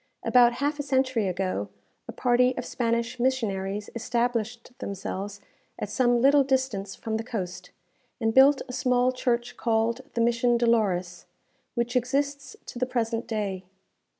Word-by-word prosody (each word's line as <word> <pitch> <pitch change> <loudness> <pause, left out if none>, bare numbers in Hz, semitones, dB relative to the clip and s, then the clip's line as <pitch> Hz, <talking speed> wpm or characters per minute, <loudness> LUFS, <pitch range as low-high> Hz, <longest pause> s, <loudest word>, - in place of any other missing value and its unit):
About 240 -1 +5
half 290 +4 -2
a - - +1
century 260 -6 +1
ago, 180 - -2 0.4
a - - -5
party 250 0 +2
of - - -3
Spanish 235 +1 -1
missionaries 210 -6 -1
established 235 0 -2
themselves 200 +1 -5 0.4
at - - -4
some 245 -2 +3
little 280 +3 +5
distance 260 -8 -1
from 220 -1 -3
the 225 - -4
coast, 180 -6 -5 0.5
and 225 -2 +1
built 270 +2 +6
a 250 - -7
small 250 0 +2
church 240 -2 -1
called 230 +1 0
the 235 - +1
Mission 235 +1 +3
Dolores, 205 -7 0 0.5
which 240 +1 -1
exists 275 +2 -1
to 240 - -8
the 255 - 0
present 230 -2 -2
day. 200 -5 -3
235 Hz, 145 wpm, -26 LUFS, 215-255 Hz, 0.5 s, built